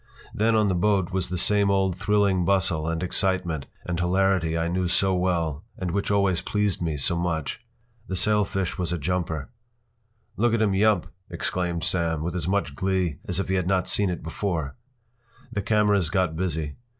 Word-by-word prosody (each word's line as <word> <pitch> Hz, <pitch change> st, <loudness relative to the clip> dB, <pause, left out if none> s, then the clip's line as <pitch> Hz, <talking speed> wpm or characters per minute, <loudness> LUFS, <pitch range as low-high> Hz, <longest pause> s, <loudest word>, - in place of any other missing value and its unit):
Then 110 Hz, +2 st, +2 dB
on 105 Hz, -1 st, +3 dB
the 95 Hz, -, +1 dB
boat 95 Hz, 0 st, +1 dB
was 95 Hz, -2 st, -1 dB
the 90 Hz, -, -2 dB
same 100 Hz, +2 st, +3 dB
old 95 Hz, -2 st, +2 dB
thrilling 100 Hz, -1 st, +2 dB
bustle 85 Hz, -4 st, +1 dB
and 80 Hz, +1 st, -2 dB
excitement 90 Hz, -5 st, 0 dB, 0.2 s
and 85 Hz, -1 st, -2 dB
hilarity 90 Hz, -2 st, +2 dB
I 85 Hz, 0 st, 0 dB
knew 90 Hz, +1 st, 0 dB
so 95 Hz, +2 st, +2 dB
well 85 Hz, -4 st, 0 dB
and 90 Hz, -2 st, -3 dB
which 100 Hz, +2 st, -1 dB
always 100 Hz, -4 st, +2 dB
pleased 105 Hz, -3 st, -1 dB
me 80 Hz, -3 st, -1 dB
so 70 Hz, +5 st, +1 dB
much. 85 Hz, +4 st, -2 dB, 0.4 s
This 95 Hz, -1 st, 0 dB
sailfish 100 Hz, -4 st, +1 dB
was 90 Hz, -2 st, -1 dB
a 90 Hz, -, 0 dB
jumper. 80 Hz, -1 st, -2 dB, 0.9 s
“Look 115 Hz, +1 st, +3 dB
at 115 Hz, -, 0 dB
him 100 Hz, -2 st, +2 dB
yump!” 105 Hz, -2 st, +3 dB, 0.2 s
exclaimed 85 Hz, -2 st, -2 dB
Sam, 85 Hz, -3 st, +1 dB
with 85 Hz, 0 st, -2 dB
as 85 Hz, -3 st, -2 dB
much 100 Hz, +1 st, 0 dB
glee 95 Hz, -5 st, -1 dB
as 90 Hz, 0 st, -2 dB
if 95 Hz, -, -1 dB
he 95 Hz, -, -1 dB
had 90 Hz, -2 st, 0 dB
not 95 Hz, -1 st, +1 dB
seen 100 Hz, -2 st, +2 dB
it 90 Hz, -, -4 dB
before. 80 Hz, -3 st, -3 dB, 0.8 s
The 100 Hz, -, -1 dB
cameras 105 Hz, -4 st, +2 dB
got 90 Hz, -3 st, 0 dB
busy. 80 Hz, -4 st, -2 dB
90 Hz, 185 wpm, -25 LUFS, 85-100 Hz, 0.9 s, on